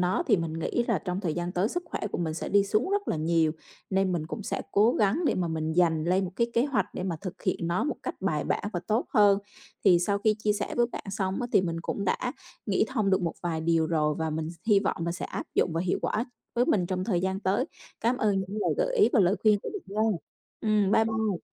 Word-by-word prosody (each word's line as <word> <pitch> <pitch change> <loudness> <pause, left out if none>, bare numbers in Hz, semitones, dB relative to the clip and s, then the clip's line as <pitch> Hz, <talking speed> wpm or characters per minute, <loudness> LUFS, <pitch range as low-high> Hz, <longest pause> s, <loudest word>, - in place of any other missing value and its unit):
nó 180 - +1
thì 215 -6 +5
mình 165 -2 -2
nghĩ 240 +8 0
là 225 -7 +2
trong 180 +3 -3
thời 165 -6 -1
gian 175 +1 -3
tới 185 +3 +1
sức 355 +7 -3
khỏe - - -4
của - - -2
mình 160 -2 -1
sẽ 165 - -4
đi 200 0 +4
xuống 215 - 0
rất 405 0 0
là - - 0
nhiều, 160 0 +2 0.4
nên 190 -1 +2
mình 155 -3 -2
cũng 205 +6 -5
sẽ - - -3
cố 215 +4 +4
gắng 210 - +2
để - - +2
mà 175 -2 -1
mình 160 0 -2
dành 160 -2 +2
lên 185 +3 +2
một 180 - -4
cái 235 - +2
kế 235 - +4
hoạch 260 -10 0
để - - -3
mà 180 -3 -2
thực 190 -1 -7
hiện 180 -3 -1
nó 170 +2 0
một 300 - -2
cách - - -3
bài - - 0
bản - - -1
và 175 - -2
tốt 220 +4 +1
hơn. 205 -3 +6 0.5
Thì 180 -4 +7
sau 200 +3 0
khi 215 +1 +2
chia 210 -1 +1
sẻ 205 0 -3
với 240 0 +4
bạn - - -6
xong 190 -1 -2
á 245 - -1
thì - - +6
mình 170 -2 -2
cũng 200 +4 -3
đã 245 +6 0 0.3
nghĩ 200 -1 +2
thông 215 -7 0
được 190 0 +2
một 170 - -1
vài 165 -2 -1
điều 165 -1 +2
rồi 150 -2 +1
và 160 -1 -1
mình 155 +1 -2 0.2
hy 205 -3 +5
vọng 200 - -1
là 170 - 0
sẽ 180 - -5
áp - - -5
dụng 170 - +2
và 165 - 0
hiệu 180 0 0
quả 225 +3 0 0.3
với 240 - +3
mình 180 -4 +2
trong 185 0 -2
thời 185 -5 +1
gian 190 +1 -1
tới. 200 +6 +1 0.4
Cám 235 +3 +1
ơn 205 -5 +1
những 190 +2 -5
lời - - +1
gợi - - 0
ý 420 - +6
và 235 - +5
lời 190 +2 +3
khuyên 215 -2 +5
của - - -4
bạn 410 - -6 0.2
nha. 215 -6 +1 0.4
Ừm, 210 -3 +2
bye 220 - +5
bye. 220 -5 -1
190 Hz, 275 wpm, -28 LUFS, 170-215 Hz, 0.5 s, Thì